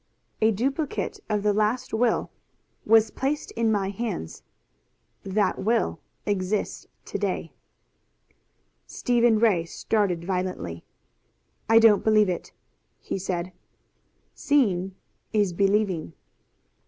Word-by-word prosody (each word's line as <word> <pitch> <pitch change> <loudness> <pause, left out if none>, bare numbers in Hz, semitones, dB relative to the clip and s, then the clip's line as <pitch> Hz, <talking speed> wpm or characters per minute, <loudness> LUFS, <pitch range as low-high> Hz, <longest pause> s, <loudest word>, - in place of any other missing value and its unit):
"A 220 - +5
duplicate 270 +8 -2
of 210 -1 0
the 210 -1 +3
last 215 +5 0
will 230 +1 +1 0.6
was 220 0 +5
placed 280 +3 -2
in 230 -1 +1
my 200 -2 0
hands. 200 - -5 0.8
That 200 +2 0
will 225 +3 0 0.3
exists 200 0 -2 0.2
to - - -4
day!" - - -2 1.3
Stephen 240 -2 +2
Ray 210 -7 +3
started 180 -1 -1
violently. 180 - -3 0.9
"I 225 - +6
don't 225 -3 +6
believe 215 -2 +4
it," 180 - -4 0.5
he - - -4
said. 180 -1 -3 0.8
"Seeing 195 -10 +1 0.4
is 205 -4 +2
believing." 195 - +1
210 Hz, 105 wpm, -25 LUFS, 185-225 Hz, 1.3 s, I